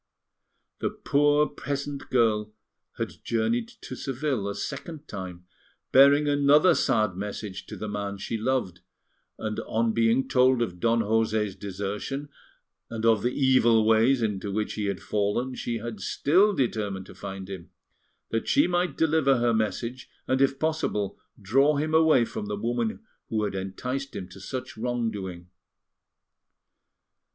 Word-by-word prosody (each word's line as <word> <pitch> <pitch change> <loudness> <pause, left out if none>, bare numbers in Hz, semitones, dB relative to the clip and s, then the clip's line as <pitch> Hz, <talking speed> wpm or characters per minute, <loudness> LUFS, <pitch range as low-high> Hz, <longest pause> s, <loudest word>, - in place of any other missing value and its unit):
The - - 0
poor 145 +1 +2
peasant 140 0 -5
girl 110 -3 +1 0.4
had - - -5
journeyed 115 0 0
to 130 - -7
Seville 130 -5 -2
a 100 - -4
second 155 - -6
time, 90 -3 -7 0.5
bearing 140 +2 +6
another 145 +4 +5
sad 110 - +1
message 100 0 -6
to - - -7
the 110 - -5
man 100 -1 -4
she 100 - -4
loved; 115 -6 -1 0.6
and 110 -1 -3
on 115 0 0
being 115 +3 +2
told 130 0 +4
of 90 -6 -5
Don 115 +2 +2
José's 110 -2 +1
desertion 105 +8 -4 0.6
and 115 -1 -4
of 110 -3 +4
the 120 - +1
evil 125 -4 +4
ways 115 +3 +4
into 100 -2 -2
which 105 +1 -2
he 105 - -3
had 100 -2 -3
fallen, 105 +5 -1
she 120 -2 -3
had 115 -2 -6
still 190 - +3
determined 105 - -1
to - - -12
find 95 -1 -7
him, 95 -3 -8 0.6
that 115 - -1
she 285 - +4
might 175 0 0
deliver 155 -4 +3
her 120 0 +2
message, 115 +3 -2 0.2
and, 130 +1 +1
if 135 0 +3
possible, 135 -11 -1 0.2
draw 135 +9 +3
him 155 +2 -1
away 160 -6 +5
from 105 - -6
the 105 - -2
woman 120 - -2 0.3
who 110 -1 0
had 105 - -2
enticed 125 +9 -4
him 90 - -5
to 95 - -12
such 130 +5 -6
wrong 120 0 -1
doing. 90 -4 -7
115 Hz, 150 wpm, -26 LUFS, 105-135 Hz, 0.6 s, bearing